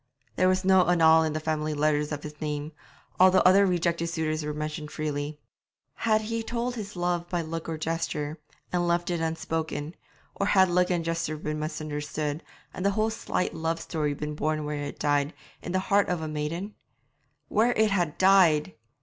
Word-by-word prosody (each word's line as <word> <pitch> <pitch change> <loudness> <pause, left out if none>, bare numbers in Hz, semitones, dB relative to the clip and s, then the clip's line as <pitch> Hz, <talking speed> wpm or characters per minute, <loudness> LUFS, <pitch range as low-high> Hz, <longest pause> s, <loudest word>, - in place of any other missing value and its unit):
There 185 - +3
was 185 0 +1
no 190 -2 +5
annal 160 -2 +6
in 160 -1 0
the 155 - -1
family 155 -1 -2
letters 150 0 +1
of 150 -1 -4
his 150 0 -9
name, 150 0 -3 0.5
although 185 0 +6
other 195 +2 +6
rejected 170 -2 0
suitors 160 -2 -2
were 150 - -2
mentioned 150 0 -4
freely. 150 -1 -4 0.5
Had 215 -1 +1
he 230 +1 -2
told 235 +2 -2
his 210 -4 -7
love 175 -1 -1
by 175 -2 -1
look 165 +1 -5
or 160 - -3
gesture, 155 -1 -3 0.3
and 175 -1 +1
left 175 +1 +1
it 170 - -1
unspoken, 160 -1 -3 0.4
or 200 - -1
had 190 -2 +5
look 180 +1 +3
and 175 -2 0
gesture 165 -2 -2
been 150 0 -4
misunderstood, 150 0 -3 0.3
and 185 - -5
the 200 - +4
whole 220 +1 +2
slight 220 -4 -2
love 165 +1 -2
story 150 -4 -2
been 150 +1 -4
born 155 0 -1
where 150 0 -3
it 145 - -3
had 145 - -7
died, 145 0 +1 0.3
in 175 - -5
the 185 - +1
heart 200 +2 +2
of 180 -2 0
the 160 - -4
maiden? 155 +7 -4 0.7
'Where 230 +3 +2
it 220 -1 +2
had 175 -6 0
died!' 185 -4 +5
165 Hz, 190 wpm, -27 LUFS, 150-185 Hz, 0.7 s, annal